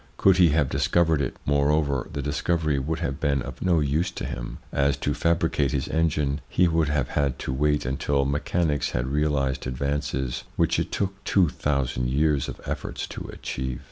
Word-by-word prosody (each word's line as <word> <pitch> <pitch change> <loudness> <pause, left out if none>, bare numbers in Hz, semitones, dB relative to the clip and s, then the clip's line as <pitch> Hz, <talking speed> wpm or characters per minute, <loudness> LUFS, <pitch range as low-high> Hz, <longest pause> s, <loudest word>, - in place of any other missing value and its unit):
Could 95 -2 +5
he 90 -3 +6
have 75 -2 +2
discovered 80 +3 +2
it, - - -2
moreover, 70 -1 +1
the 70 - -4
discovery 75 0 0
would 80 +5 -3
have 70 -3 -2
been 70 -3 +1
of 65 -1 -8
no 90 -3 +3
use 75 +5 +1
to - - -6
him, - - -5 0.2
as, 70 0 +2
to - - -1
fabricate 85 -4 +1
his 70 +1 -1
engine, 75 -3 0
he 90 - +3
would 80 -3 +1
have 75 -4 0
had 70 -3 0
to 65 - -3
wait 75 +1 +1
until 70 +2 0
mechanics 75 0 0
had 60 0 -1
realised 70 -2 0
advances 65 -1 -2
which - - +2
it - - -2
took 95 0 -2
two 90 -5 +3
thousand 70 -4 -1
years 70 0 +1
of - - -7
efforts - - -4
to - - -7
achieve. 65 -1 -4
70 Hz, 180 wpm, -25 LUFS, 70-80 Hz, 0.2 s, he